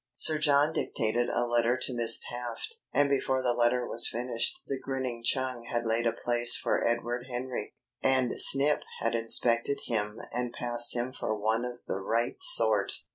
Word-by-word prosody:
Sir 155 +4 +1
John 145 +1 +1
dictated 120 -3 -3
a 120 - -2
letter 120 +1 0
to 130 - -1
Miss 115 -1 +6
Taft, 120 - -8
and 145 0 +1
before 135 -1 -2
the 125 -1 +1
letter 120 +1 0
was 120 - 0
finished 125 - -3
the 135 - -5
grinning 130 -3 -6
Chung 130 -1 -2
had 120 0 -4
laid 115 +1 -1
a - - +1
place 120 +1 +4
for 125 - -2
Edward 120 +1 -3
Henry, 125 +1 -7 0.3
and 130 -2 0
Snip 140 +2 +7 0.2
had 115 - -2
inspected 115 +3 +2
him 105 -2 -4
and 125 0 -5
passed 120 0 +2
him 120 +2 -4
for 110 - -4
one 110 +3 -2
of 125 0 -9
the - - -5
right 115 +4 -3
sort. - - +4
120 Hz, 175 wpm, -27 LUFS, 115-130 Hz, 0.3 s, Snip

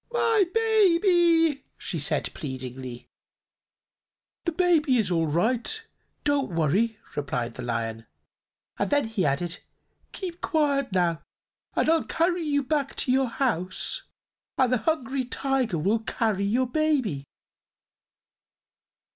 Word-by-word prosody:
"My 460 -4 +3
baby!" 345 -8 +3
she - - -4
said - - 0
pleadingly. 130 -4 -6 1.4
"The 340 - +1
baby 315 -6 +3
is 215 -5 0
all 165 -2 +2
right; 235 - 0 0.4
don't 280 - 0
worry," 195 +9 +1 0.2
replied 125 -5 -2
the - - -7
Lion; 115 -2 -3 0.7
and 200 - 0
then 290 -3 +2
he 220 -7 0
added: 165 +6 -1 0.5
"Keep 360 -3 -6
quiet, 280 -5 +1
now, 175 -3 +1 0.5
and - - +2
I'll 325 0 +3
carry 345 +2 0
you 290 -3 0
back 285 0 -1
to 250 - 0
your 265 0 +3
house, 230 - 0 0.6
and 255 -1 +3
the - - +4
Hungry 270 -1 -1
Tiger 255 -6 -1
will 200 +9 +1
carry 220 -2 -1
your 240 +6 +2
baby." 260 - 0
255 Hz, 120 wpm, -26 LUFS, -, 1.4 s, the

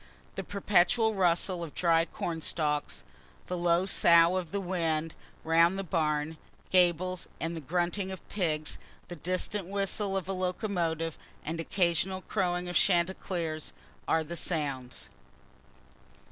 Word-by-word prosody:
The - - -4
perpetual 205 +3 +2
rustle 180 -1 +2
of 160 - -8
dry 165 -2 +3
corn 165 -1 -4
stalks, 150 -2 -1 0.4
the 180 - -3
low 175 +1 +2
sough 170 -2 +6
of 180 -3 -2
the 200 - -1
wind 165 -4 -1 0.3
round 165 +3 +4
the 195 - -2
barn 155 -3 -1 0.3
gables, 180 0 +2
the 165 0 -3
grunting 180 +5 -1
of 190 - -8
pigs, 155 -6 -2 0.3
the 175 - -5
distant 185 +3 -2
whistle 195 0 0
of 185 - -4
a 195 - -1
locomotive, 180 -4 -2 0.3
and 165 +2 -3
occasional 180 +2 0
crowing 180 -3 -1
of 175 - -5
chanticleers, 170 -3 0 0.3
are 160 0 +2
the 170 +3 -6
sounds. 140 -8 -3
175 Hz, 130 wpm, -30 LUFS, 165-185 Hz, 0.4 s, sough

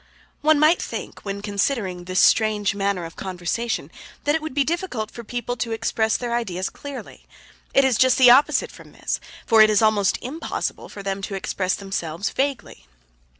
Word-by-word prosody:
One 310 0 +4
might 310 +3 +4
think, - - -6
when 200 0 -5
considering 200 -3 -1
this 185 +1 0
strange 210 -2 +3
manner 200 -3 -1
of 165 - -10
conversation, 190 +6 -3 0.3
that 290 - +2
it 320 - 0
would 310 -4 -6
be 285 - +3
difficult 295 - -3
for 235 - -8
the - - -16
people 245 +1 -3
to 225 +1 -2
express 220 0 0
their 240 -1 -3
ideas 190 -6 -2
clearly. 285 -2 -9 0.5
It 275 - +6
is 255 -4 +2
just 255 -1 +5
the 250 -2 +8
opposite 270 +4 +4
from - - -15
this, - - -3 0.3
for 225 -2 +6
it 215 - +7
is 215 +1 +3
almost 210 -3 +3
impossible 305 +7 -4
for 200 - -9
them 195 0 -3
to 195 0 -4
express 185 -1 -1
themselves 195 -2 -3
vaguely. 265 - -3
220 Hz, 185 wpm, -23 LUFS, 195-260 Hz, 0.5 s, the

